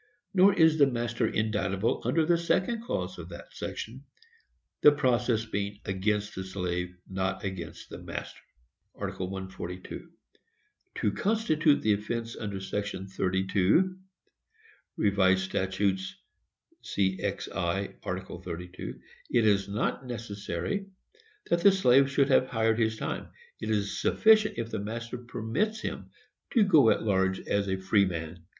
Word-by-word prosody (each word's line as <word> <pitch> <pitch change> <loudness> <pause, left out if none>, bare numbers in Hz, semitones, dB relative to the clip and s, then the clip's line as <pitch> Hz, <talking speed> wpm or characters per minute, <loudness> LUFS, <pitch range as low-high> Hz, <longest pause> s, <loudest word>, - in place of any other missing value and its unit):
Nor 195 +1 +6
is 160 -3 +5
the 140 - +7
master 120 -2 -1
indictable 105 -1 0
under 155 +7 +2
the 170 +2 +4
second 185 +7 0
clause 240 - -3
of - - -8
that - - -11
section; - - -6 0.8
the 150 - +9
process 125 -5 +1
being 100 -1 -3
against 105 +2 -1
the 95 - -4
slave, 90 -1 -3
not 95 0 -2
against 95 -3 -6
the - - -7
master.—Ib. - - -9
142. 95 -1 -6 0.9
To 105 - +1
constitute 165 - +2
the 110 - +4
offence 115 +3 -3
under 100 -3 -4
section 95 0 -4
32 95 - +2 1.0
(Rev. 95 -2 +3
Stat. 95 0 -2
c. 100 -1 +2 1.3
cxi. 85 +3 -2
§ - - -5
32) 90 +2 -7 0.3
it 115 -2 +3
is 100 -2 +3
not 110 +5 -2
necessary 110 - -4 0.6
that 170 0 +3
the 200 - +8
slave 140 -7 +5
should 140 0 +2
have 130 -1 +4
hired 110 -2 +1
his 110 -1 +1
time; - - -4 0.3
it 110 - -4
is 105 -2 -1
sufficient 215 - +4
if 115 -1 -3
the - - -2
master 115 +4 -5
permits 125 - -2
him - - -5 0.4
to 230 - +6
go 155 - +6
at - - +2
large 95 -2 +1
as 100 0 0
a 95 - 0
freeman. 90 -4 0
110 Hz, 130 wpm, -29 LUFS, 95-135 Hz, 1.3 s, the